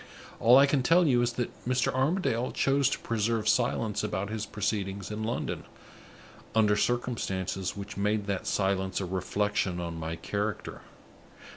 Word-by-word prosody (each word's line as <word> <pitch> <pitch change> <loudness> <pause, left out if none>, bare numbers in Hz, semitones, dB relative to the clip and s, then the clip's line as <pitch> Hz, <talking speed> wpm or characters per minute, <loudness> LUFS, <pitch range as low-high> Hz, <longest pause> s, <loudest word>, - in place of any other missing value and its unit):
All 120 +3 +7
I 140 - +8
can 140 -1 +1
tell 170 +7 +4
you 125 -5 +4
is 120 0 +1
that 120 0 -2
Mr. 125 -1 +1
Armadale 130 -3 +1
chose 135 -1 +2
to - - -1
preserve 115 -1 -1
silence 115 -4 +1
about 100 -1 -2
his 110 -1 -3
proceedings 100 -1 -3
in 105 +1 -4
London, 115 +2 -3 0.9
under 105 -2 +4
circumstances 100 -6 -1
which 100 0 -7
made 105 +1 0
that 100 -2 -3
silence 95 -1 0
a 95 - -2
reflection 95 0 -1
on 85 -1 -4
my 80 +1 -3
character. 105 +4 -4
105 Hz, 150 wpm, -29 LUFS, 100-120 Hz, 0.9 s, I